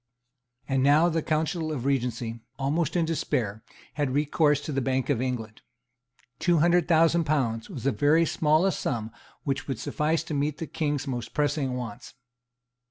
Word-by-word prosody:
And 135 -1 +1
now 150 +5 +5
the 165 -1 0
Council 155 +1 -1
of 135 -5 -4
Regency, 120 -4 -1 0.2
almost 145 +4 0
in 170 -2 +2
despair, 125 -10 -2 0.3
had 145 -3 -1
recourse 150 0 +2
to 150 - -5
the 135 -1 0
Bank 130 +2 0
of 125 -4 0
England. 115 -4 -4 0.8
Two 175 -1 +3
hundred 175 +1 +3
thousand 165 0 +4
pounds 120 -7 0
was 145 - -7
the 140 - +2
very 155 +5 +3
smallest 160 +4 +2
sum 110 -3 -2 0.3
which 135 -2 -2
would 135 -4 -2
suffice 155 +7 -1
to 160 - -6
meet 145 +1 -1
the 165 - -4
King's 145 -3 -2
most 120 -4 -5
pressing 145 -3 0
wants. 115 -5 -7
145 Hz, 165 wpm, -27 LUFS, 130-160 Hz, 0.8 s, now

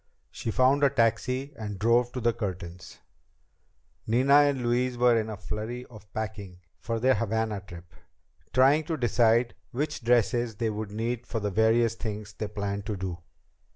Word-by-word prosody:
She - - -5
found 130 +5 +3
a 140 - +6
taxi 130 +2 0
and 105 -4 -6
drove 120 +4 +2
to 125 - -3
the 120 -1 +1
Curtins'. 95 -5 -6 1.1
Nina 125 +5 +3
and 145 -3 +5
Louise 120 +1 0
were 120 -1 +4
in 110 -1 0
a 110 - -5
flurry 115 +5 -5
of 105 -3 -14
packing 105 -4 -6 0.2
for 115 -1 -3
their 130 +3 +4
Havana 110 -2 -1
trip, 85 -4 -12 0.6
trying 135 +4 +4
to 160 0 -2
decide 120 -1 +3 0.2
which 140 0 -3
dresses 120 -1 +2
they 110 +1 -1
would 105 0 -4
need 115 +3 -3
for 115 - -2
the 105 -1 -2
various 110 +2 +3
things 105 -2 -6
they 105 0 -4
planned 100 0 -4
to 105 - -2
do. 90 -2 -4
115 Hz, 165 wpm, -27 LUFS, 105-125 Hz, 1.1 s, a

